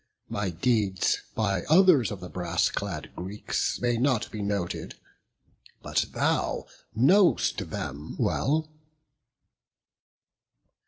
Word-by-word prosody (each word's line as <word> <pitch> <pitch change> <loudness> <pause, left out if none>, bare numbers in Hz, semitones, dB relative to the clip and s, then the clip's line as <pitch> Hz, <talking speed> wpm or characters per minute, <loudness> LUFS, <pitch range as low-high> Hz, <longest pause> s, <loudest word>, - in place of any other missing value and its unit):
My 105 -2 -2
deeds 95 +1 +1
by 100 -4 0
others 160 - +6
of 100 - -6
the 90 - -6
brass 85 -2 0
clad - - -4
Greeks 95 +4 -2
May 120 -1 +1
not 125 -3 +1
be 110 - -5
noted; 100 -3 -3 0.9
but - - 0
thou - - 0 0.3
know'st 175 - +3
them 75 +3 -6
well." 155 +3 +1
105 Hz, 100 wpm, -27 LUFS, 90-130 Hz, 0.9 s, others